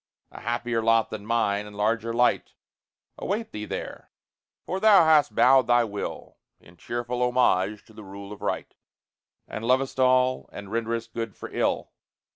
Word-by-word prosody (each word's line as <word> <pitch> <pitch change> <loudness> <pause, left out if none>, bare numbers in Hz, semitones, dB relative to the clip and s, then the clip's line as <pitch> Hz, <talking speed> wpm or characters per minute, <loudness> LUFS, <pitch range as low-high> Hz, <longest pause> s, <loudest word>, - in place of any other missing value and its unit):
A - - -10
happier 120 0 -1
lot 115 0 +2
than 105 -1 -7
mine, 105 -3 0
and 105 - -12
larger 115 +2 0
light, 120 +1 +1 0.7
Await 215 +3 -3
thee 105 0 -5
there; - - -7 0.6
for 185 - -3
thou 205 -5 +6
hast 155 -2 +4
bowed 130 +1 +5
thy 120 0 +4
will 105 -3 -6 0.2
In 85 - -19
cheerful 120 +6 -4
homage 105 -5 +1
to 110 - -19
the 110 - -11
rule 100 +1 -10
of 105 - -10
right, - - -3 0.7
And 110 - -6
lovest 130 +2 +1
all, 130 0 +2
and 100 -1 -9
renderest 115 0 -3
good 115 -3 -4
for - - -9
ill. - - -1
115 Hz, 160 wpm, -25 LUFS, 105-125 Hz, 0.7 s, thou